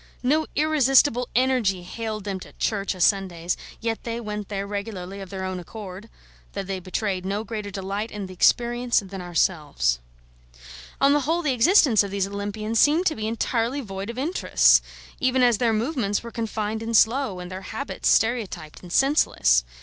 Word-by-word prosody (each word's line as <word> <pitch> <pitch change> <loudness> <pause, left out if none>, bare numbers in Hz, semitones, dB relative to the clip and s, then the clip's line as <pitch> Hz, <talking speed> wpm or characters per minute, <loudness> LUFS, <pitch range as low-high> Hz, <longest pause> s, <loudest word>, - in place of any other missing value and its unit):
No 305 +5 +2
irresistible 270 -4 +3
Energy 240 -8 +2
haled 215 +2 -5
them 195 -2 -4
to - - -12
church 200 -2 -1
o' - - -10
Sundays; 180 -2 +1 0.3
yet 225 -1 -2
they 230 0 -3
went 210 -3 -5
there 200 -1 -3
regularly 200 -2 -5
of 190 - -8
their 190 0 -5
own 185 -1 -3
accord, 195 +2 -9 0.4
though 200 - -3
they 190 0 -4
betrayed 185 +1 -2
no 200 +3 -2
greater 215 -2 -5
delight 200 +2 -4
in 210 -2 -6
the 185 - -9
experience 240 +5 +2
than 190 0 -7
ourselves. 150 - 0 1.0
On 275 +1 +5
the 295 - +4
whole, 325 +5 0
the 285 -4 +1
existence 260 - +5
of 200 - -2
these 195 -1 -1
Olympians 205 +3 -3
seemed 315 +5 +4
to 320 - +2
be 215 0 -3
entirely 230 +3 -1
void 195 -4 -6
of 235 - -6
interests, 310 +8 +4 0.4
even 255 0 +2
as 240 -3 +4
their 235 -2 +2
movements 225 -3 -1
were 235 - -8
confined 220 -1 -3
and 225 0 +2
slow, 230 -4 +2
and 180 0 -8
their 185 +1 -6
habits 275 +8 -3
stereotyped 220 -9 0
and 180 - -11
senseless. 270 - +3
215 Hz, 175 wpm, -24 LUFS, 195-245 Hz, 1.0 s, On